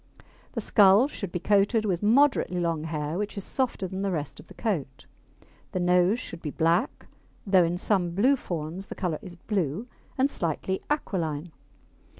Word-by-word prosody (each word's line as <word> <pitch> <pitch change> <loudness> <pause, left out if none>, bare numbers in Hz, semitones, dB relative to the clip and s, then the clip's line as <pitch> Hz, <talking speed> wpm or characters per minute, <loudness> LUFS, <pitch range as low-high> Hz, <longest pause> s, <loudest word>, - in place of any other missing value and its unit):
The - - -2
skull 205 +4 +5
should 200 -10 -6
be - - -2
coated 205 +4 +2
with 180 -4 0
moderately 230 -4 +3
long 165 -2 -1
hair 155 +1 -3
which 210 0 -4
is 200 - -3
softer 250 -7 -1
than 190 +2 -5
the 200 - 0
rest 150 -6 -4
of - - -14
the - - -14
coat. 165 - -3 0.7
The 185 - -1
nose 180 +5 +3
should 170 -9 -8
be 150 - -4
black 165 - 0 0.4
(though 190 -3 +5
in 170 +1 0
some 180 -3 0
blue 255 +8 +4
fawns 175 - -5
the - - -7
colour 175 -5 -2
is 180 -5 -10
blue) 180 - -2 0.3
and 265 +1 +4
slightly 190 - -2
aquiline. 170 - -2
185 Hz, 170 wpm, -27 LUFS, 165-210 Hz, 0.7 s, skull